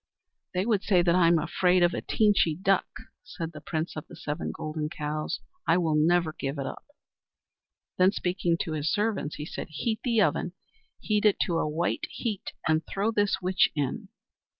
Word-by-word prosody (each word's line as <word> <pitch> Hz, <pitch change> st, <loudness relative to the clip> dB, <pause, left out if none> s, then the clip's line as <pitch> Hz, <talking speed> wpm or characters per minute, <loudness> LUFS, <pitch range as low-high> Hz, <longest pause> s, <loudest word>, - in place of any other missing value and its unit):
"They 185 Hz, +2 st, +1 dB
would 215 Hz, -4 st, +2 dB
say 185 Hz, -4 st, +3 dB
that 170 Hz, -1 st, +3 dB
I 180 Hz, -1 st, +5 dB
am 170 Hz, 0 st, +5 dB
afraid 180 Hz, +2 st, +2 dB
of 175 Hz, -, +3 dB
a -, -, -2 dB
Teenchy 205 Hz, -7 st, +3 dB
Duck," 195 Hz, -1 st, +2 dB, 0.4 s
said 170 Hz, -9 st, -6 dB
the 155 Hz, -2 st, -10 dB
Prince 160 Hz, +2 st, -3 dB
of 155 Hz, -, -6 dB
the -, -, -12 dB
Seven 150 Hz, +3 st, -4 dB
Golden 155 Hz, 0 st, -4 dB
Cows. 155 Hz, 0 st, -3 dB, 0.3 s
"I -, -, +5 dB
will 165 Hz, -3 st, +1 dB
never 160 Hz, +1 st, +3 dB
give 140 Hz, 0 st, -4 dB
it 135 Hz, -, -3 dB
up." -, -, -7 dB, 1.1 s
Then, 185 Hz, +1 st, +6 dB
speaking 180 Hz, -3 st, 0 dB
to 160 Hz, -, -3 dB
his 155 Hz, +2 st, -1 dB
servants, 210 Hz, -8 st, -1 dB
he 150 Hz, -, -6 dB
said: -, -, -6 dB
"Heat 220 Hz, +9 st, -2 dB
the 235 Hz, -3 st, +2 dB
oven, 185 Hz, -3 st, +1 dB, 0.5 s
heat 210 Hz, -1 st, 0 dB
it 210 Hz, -2 st, +4 dB
to 170 Hz, -3 st, +1 dB
a 155 Hz, -, 0 dB
white 165 Hz, +3 st, -1 dB
heat, 215 Hz, -4 st, -4 dB
and 160 Hz, 0 st, +2 dB
throw 205 Hz, +3 st, 0 dB
this 205 Hz, -3 st, +1 dB
witch 185 Hz, +1 st, +3 dB
in." 145 Hz, +8 st, -2 dB
175 Hz, 190 wpm, -28 LUFS, 155-195 Hz, 1.1 s, Then